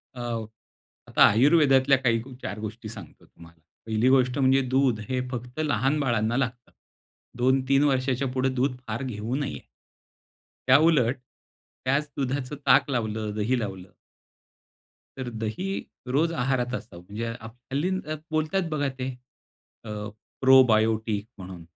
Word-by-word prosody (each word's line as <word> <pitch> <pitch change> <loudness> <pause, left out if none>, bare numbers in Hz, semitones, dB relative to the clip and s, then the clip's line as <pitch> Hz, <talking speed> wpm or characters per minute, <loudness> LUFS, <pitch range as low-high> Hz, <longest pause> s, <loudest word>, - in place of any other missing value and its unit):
अ, 125 - -6 0.9
आता - - +5
आयुर्वेदातल्या 135 +2 +5
काही 120 -3 +1 0.2
चार 100 +3 -5
गोष्टी 110 +1 -6
सांगतो 100 -6 -11
तुम्हाला. 85 -1 -18 0.2
पहिली 110 +3 +2
गोष्ट 130 -1 +3
म्हणजे 135 0 +4
दूध 130 -4 +2
हे 130 -1 0
फक्त 125 +2 -6
लहान 145 -1 +1
बाळांना 120 -4 0
लागतं. 120 -2 -3 0.7
2-3 130 +2 +3
वर्षाच्या 130 -1 +1
पुढे 130 0 +1
दूध 130 +1 0
फार 110 +4 -3
घेऊ 115 -1 -4
नये. 145 -1 -3 1.1
त्याउलट, 135 -3 +4 0.7
त्याच 140 +3 +1
दुधाचं 135 +1 -2
ताक 140 +1 +5
लावलं, 110 -4 -2
दही 115 +4 0
लावलं 95 -4 -6 1.3
तर 130 -2 -4
दही, 110 - -4 0.4
रोज 150 +6 +1
आहारात 125 -3 -1
असावं. 90 -8 -7
म्हणजे 110 +3 -4
हल्ली 125 +8 -4 0.4
बोलतायेत 160 +3 0
बघा 150 -2 -1
ते, 130 +1 -2 0.7
अ, 115 - -9 0.5
प्रोबायोटिक 110 -5 +4
म्हणून. 90 -2 -9
125 Hz, 120 wpm, -26 LUFS, 110-135 Hz, 1.3 s, आता